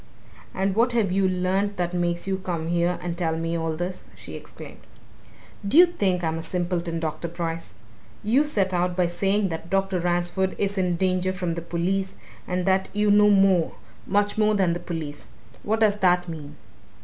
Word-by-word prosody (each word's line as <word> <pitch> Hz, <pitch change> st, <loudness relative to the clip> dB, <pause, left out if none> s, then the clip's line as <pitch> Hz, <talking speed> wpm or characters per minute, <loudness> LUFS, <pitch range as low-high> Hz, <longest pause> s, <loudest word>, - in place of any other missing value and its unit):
"And 190 Hz, +1 st, 0 dB
what 235 Hz, +2 st, +3 dB
have 220 Hz, -6 st, +1 dB
you 190 Hz, 0 st, +2 dB
learnt 190 Hz, +3 st, 0 dB
that 175 Hz, 0 st, -1 dB
makes 175 Hz, -1 st, -1 dB
you 190 Hz, -1 st, -1 dB
come 170 Hz, -3 st, -3 dB
here 175 Hz, +1 st, +1 dB
and 175 Hz, -1 st, -3 dB
tell 165 Hz, -2 st, -1 dB
me 165 Hz, +1 st, -2 dB
all 165 Hz, -1 st, -1 dB
this?" 180 Hz, +3 st, -4 dB
she -, -, -11 dB
exclaimed. -, -, -10 dB, 0.9 s
"Do 240 Hz, -, +3 dB
you 355 Hz, -, +10 dB
think 195 Hz, -, -1 dB
I'm 160 Hz, 0 st, -1 dB
a -, -, -4 dB
simpleton, 175 Hz, -1 st, -2 dB
Dr. 165 Hz, +1 st, -3 dB
Bryce? 165 Hz, -, -5 dB, 0.5 s
You 240 Hz, +8 st, +3 dB
set 200 Hz, -11 st, 0 dB
out 180 Hz, 0 st, 0 dB
by 180 Hz, -1 st, +2 dB
saying 195 Hz, +3 st, 0 dB
that 165 Hz, 0 st, -6 dB
Dr. 195 Hz, 0 st, +1 dB
Ransford 175 Hz, +2 st, 0 dB
is 200 Hz, 0 st, -1 dB
in 180 Hz, -2 st, +1 dB
danger 185 Hz, +1 st, +1 dB
from 180 Hz, -2 st, -2 dB
the 170 Hz, -, -4 dB
police, 185 Hz, +3 st, -2 dB, 0.3 s
and 180 Hz, 0 st, -1 dB
that 190 Hz, 0 st, +2 dB
you 210 Hz, 0 st, +2 dB
know 210 Hz, 0 st, +6 dB
more 195 Hz, -4 st, +4 dB, 0.3 s
much 205 Hz, +1 st, +1 dB
more 215 Hz, 0 st, +3 dB
than 185 Hz, -4 st, +2 dB
the 175 Hz, -, -3 dB
police! 155 Hz, -5 st, -6 dB, 0.4 s
what 220 Hz, +2 st, -1 dB
does 210 Hz, -2 st, +4 dB
that 180 Hz, -2 st, +3 dB
mean? 150 Hz, -3 st, -8 dB
180 Hz, 185 wpm, -24 LUFS, 170-195 Hz, 0.9 s, you